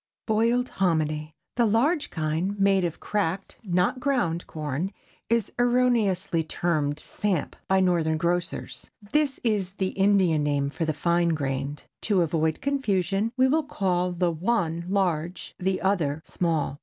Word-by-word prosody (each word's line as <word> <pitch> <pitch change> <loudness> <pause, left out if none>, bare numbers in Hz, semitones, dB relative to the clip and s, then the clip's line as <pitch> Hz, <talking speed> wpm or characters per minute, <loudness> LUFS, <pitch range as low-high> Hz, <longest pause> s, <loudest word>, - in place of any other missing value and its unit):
BOILED 235 +3 +2
HOMINY. 155 -4 0 0.3
The 235 -2 +4
large 280 +9 +2
kind, 165 +6 -2
made 195 -1 +4
of 170 -2 -2
cracked, 195 -2 -2
not 180 +5 +1
ground 210 -12 0
corn, 155 +4 -3 0.4
is 230 -2 +1
erroneously 235 -9 +2
termed 155 -3 -1
"samp" 190 -4 -2
by 190 0 +3
Northern 170 -4 +2
grocers. 175 +2 -2 0.2
This 295 -2 +1
is 205 -5 0
the 190 -1 -1
Indian 190 -6 +3
name 145 -1 0
for 165 - -2
the 155 - 0
fine 170 +1 +2
grained. 140 0 -3 0.2
To 195 -5 +2
avoid 160 -1 0
confusion, 210 -6 0
we 260 0 +5
will 310 +4 +3
call 180 -9 0
the 175 0 +1
one 170 -1 -1
large, 175 -3 -1
the 190 +1 0
other 160 -6 0
small. 155 -5 -1
180 Hz, 140 wpm, -26 LUFS, 160-205 Hz, 0.4 s, we